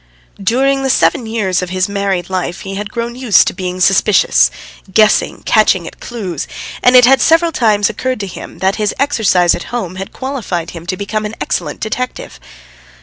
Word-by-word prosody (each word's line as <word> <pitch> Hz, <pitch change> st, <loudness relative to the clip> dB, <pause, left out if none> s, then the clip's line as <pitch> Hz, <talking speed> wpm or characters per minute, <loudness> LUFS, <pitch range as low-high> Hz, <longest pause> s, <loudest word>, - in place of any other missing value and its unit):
During 270 Hz, +7 st, +1 dB
the 270 Hz, -, -1 dB
seven 250 Hz, -2 st, +2 dB
years 195 Hz, -5 st, -1 dB
of 180 Hz, -, -4 dB
his 185 Hz, 0 st, 0 dB
married 200 Hz, -3 st, -2 dB
life 185 Hz, -1 st, -3 dB
he 195 Hz, -, -6 dB
had 205 Hz, +1 st, -5 dB
grown 235 Hz, 0 st, -4 dB
used 250 Hz, -5 st, +4 dB
to -, -, -1 dB
being 180 Hz, 0 st, -5 dB
suspicious, 195 Hz, +2 st, +4 dB, 0.4 s
guessing, 215 Hz, +2 st, +2 dB
catching 215 Hz, -5 st, +2 dB
at -, -, -10 dB
clues, 195 Hz, -, -5 dB, 0.3 s
and 250 Hz, +1 st, +4 dB
it 250 Hz, -1 st, +8 dB
had 265 Hz, +2 st, +4 dB
several 330 Hz, +1 st, +3 dB
times 215 Hz, -7 st, +2 dB
occurred 255 Hz, +3 st, -3 dB
to -, -, -3 dB
him, 190 Hz, -, -9 dB
that 190 Hz, +1 st, 0 dB
his 210 Hz, -1 st, -1 dB
exercise 215 Hz, -11 st, +2 dB
at -, -, -5 dB
home 185 Hz, -7 st, -5 dB
had 195 Hz, +1 st, -6 dB
qualified 220 Hz, -11 st, -4 dB
him 170 Hz, 0 st, -10 dB
to 185 Hz, 0 st, -2 dB
become 210 Hz, +2 st, -3 dB
an 210 Hz, +1 st, -5 dB
excellent 150 Hz, -4 st, -3 dB
detective. 225 Hz, -, -4 dB
205 Hz, 185 wpm, -15 LUFS, 185-245 Hz, 0.4 s, it